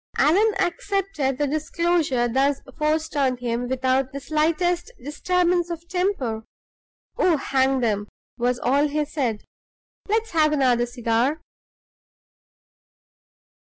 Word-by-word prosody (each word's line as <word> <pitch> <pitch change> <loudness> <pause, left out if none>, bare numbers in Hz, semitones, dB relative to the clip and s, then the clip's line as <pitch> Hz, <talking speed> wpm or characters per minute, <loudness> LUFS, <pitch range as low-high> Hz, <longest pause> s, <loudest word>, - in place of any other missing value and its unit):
Allan 390 +9 +4
accepted 355 -7 -1
the 295 - +1
disclosure 310 -3 0
thus 270 +3 +1 0.2
forced 310 +1 -1
on 265 -3 +1
him 245 0 -2
without 260 0 +1
the 280 - -5
slightest 330 - 0
disturbance 350 +4 +1
of 340 0 -6
temper. 345 - -1 0.8
"Oh, 345 -4 +4
hang 265 -1 +1
'em!" 205 -2 0 0.3
was 245 +1 0
all 280 +5 +2
he 300 +1 -1
said. 255 -8 -2 0.7
"Let's 445 +1 0
have 310 -2 +3
another 250 -4 +2
cigar." 240 +4 0
290 Hz, 110 wpm, -23 LUFS, 255-340 Hz, 0.8 s, Allan